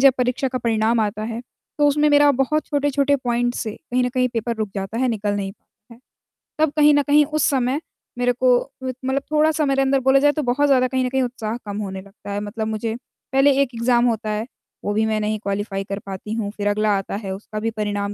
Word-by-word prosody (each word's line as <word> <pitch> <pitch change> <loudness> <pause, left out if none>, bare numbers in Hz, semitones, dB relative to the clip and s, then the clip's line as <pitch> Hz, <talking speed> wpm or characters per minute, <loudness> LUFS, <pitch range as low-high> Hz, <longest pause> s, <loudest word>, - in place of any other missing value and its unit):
जब 275 0 +7
परीक्षा 250 +2 0
का 255 0 -3
परिणाम 225 0 +1
आता 215 0 -1
है, 230 +1 -4 0.4
तो 295 - +4
उसमें 295 +1 +3
मेरा 290 0 +6
बहुत 270 +4 0
छोटे-छोटे 285 -1 +1
पॉइंट 245 -1 -1
से 220 - -3 0.2
कहीं 250 +1 +2
न - - +1
कहीं 250 0 +1
पेपर 235 0 -2
रुक 215 -2 -3
जाता 195 +3 -4
है, 255 0 +2
निकल 205 -2 -1
नहीं 195 -1 -3
पाता 220 +2 -21
है। 235 - -21 0.6
तब 315 -2 +3
कहीं 300 0 +6
न 290 - +4
कहीं 295 +2 +5
उस 305 0 -1
समय 265 +1 +1 0.4
मेरे 245 0 +2
को 250 0 +4 0.3
मतलब 260 +1 -2
थोड़ा-सा 310 0 +3
मेरे 270 0 +2
अंदर 270 0 +2
बोला 265 +1 +4
जाए, 290 +1 +4
तो 305 - -2
बहुत 280 +4 +2
ज़्यादा 255 -2 +4
कहीं 260 0 0
न - - -1
कहीं 265 +1 0
उत्साह 235 -2 -3
कम 205 0 -5
होने 190 -2 -4
लगता 200 +1 -11
है, 200 - -2
मतलब 220 +1 -4
मुझे 220 +1 -2 0.4
पहले 270 +1 +5
एक 275 - +1
एग्ज़ाम 240 +1 +2
होता 225 -2 0
है 210 +2 -2 0.4
वो 205 - 0
भी 220 +1 +2
मैं 215 -1 0
नहीं 215 0 -1
क्वालीफाई 200 -1 -3
कर 200 +1 -5
पाती 195 +2 -6
हूँ। 225 -3 -2
फ़िर 205 -1 -3
अगला 215 +1 +1
आता 195 - -4
है 200 -2 -5
उसका 215 +2 -6
भी 225 +1 -1
परिणाम 205 -2 -2
240 Hz, 235 wpm, -21 LUFS, 215-270 Hz, 0.6 s, जब